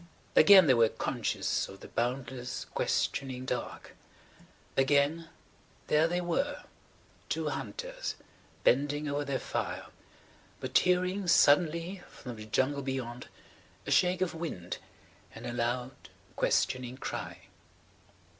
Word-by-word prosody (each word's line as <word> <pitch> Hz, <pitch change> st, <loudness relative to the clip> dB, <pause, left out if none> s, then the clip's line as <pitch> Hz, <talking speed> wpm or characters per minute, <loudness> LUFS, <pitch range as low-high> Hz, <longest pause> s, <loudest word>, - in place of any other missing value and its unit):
Again 195 Hz, -3 st, +9 dB
they 135 Hz, -, +6 dB
were 115 Hz, -2 st, +5 dB
conscious -, -, -1 dB
of 95 Hz, -, -12 dB
the -, -, -9 dB
boundless, 125 Hz, +1 st, -3 dB
questioning 130 Hz, -2 st, -1 dB
dark. 125 Hz, -2 st, -5 dB, 0.8 s
Again, 145 Hz, +4 st, +2 dB, 0.6 s
there 155 Hz, +2 st, +3 dB
they 175 Hz, -, -2 dB
[Page 180 Hz, -, +1 dB
151] 175 Hz, +5 st, -1 dB, 0.2 s
were–two -, -, -8 dB
hunters, -, -, -5 dB, 0.5 s
bending 145 Hz, +3 st, +2 dB
over 145 Hz, 0 st, -1 dB
their 140 Hz, -2 st, -1 dB
fire, -, -, -3 dB, 0.7 s
but -, -, -6 dB
hearing 185 Hz, +1 st, +2 dB
suddenly 170 Hz, +3 st, +4 dB
from 125 Hz, -3 st, -9 dB
the 110 Hz, 0 st, -9 dB
jungle 135 Hz, +5 st, +1 dB
beyond 130 Hz, -2 st, -4 dB, 0.6 s
a -, -, -4 dB
shake 180 Hz, 0 st, +3 dB
of 185 Hz, -, 0 dB
wind 160 Hz, -, -5 dB, 0.6 s
and -, -, -9 dB
a 120 Hz, -, -4 dB
loud, 120 Hz, +1 st, -1 dB, 0.4 s
questioning 130 Hz, 0 st, 0 dB
cry -, -, -5 dB
140 Hz, 115 wpm, -30 LUFS, 125-170 Hz, 0.8 s, Again